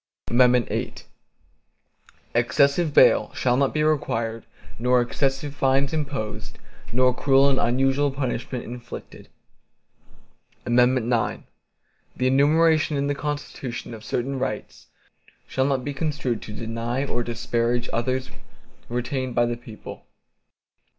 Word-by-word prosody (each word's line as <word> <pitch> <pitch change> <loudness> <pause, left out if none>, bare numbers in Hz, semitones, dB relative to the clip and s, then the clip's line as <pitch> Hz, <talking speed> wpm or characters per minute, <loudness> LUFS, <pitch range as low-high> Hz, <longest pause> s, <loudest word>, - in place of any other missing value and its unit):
VIII 125 -1 +3 1.4
Excessive 140 +7 +2
bail - - +5
shall 125 -1 +2
not 135 +1 +2
be 150 - 0
required 115 -7 -1 0.3
nor 125 +1 +3
excessive 135 +3 -1
fines 135 +1 +1
imposed, 140 -9 -4 0.3
nor 125 +2 +3
cruel 135 +1 +4
and 130 - +1
unusual 135 +4 +2
punishments 130 -2 -3
inflicted. 120 0 -9 1.4
IX 120 -1 +2 0.7
The 130 - -1
enumeration 155 +3 +3
in 140 - 0
the 145 - 0
Constitution, 140 -5 -5
of 110 -1 -9
certain 130 +4 -2
rights, 105 -5 -5 0.6
shall 130 - 0
not 135 -2 0
be 145 - -3
construed 135 -5 -2
to - - -8
deny 115 +4 -3
or 120 -3 -1
disparage 120 0 -1
others 130 +3 -1 0.6
retained 125 +1 -2
by 120 - +4
the 120 0 -1
people. 115 -2 -11
130 Hz, 110 wpm, -24 LUFS, 120-140 Hz, 1.4 s, bail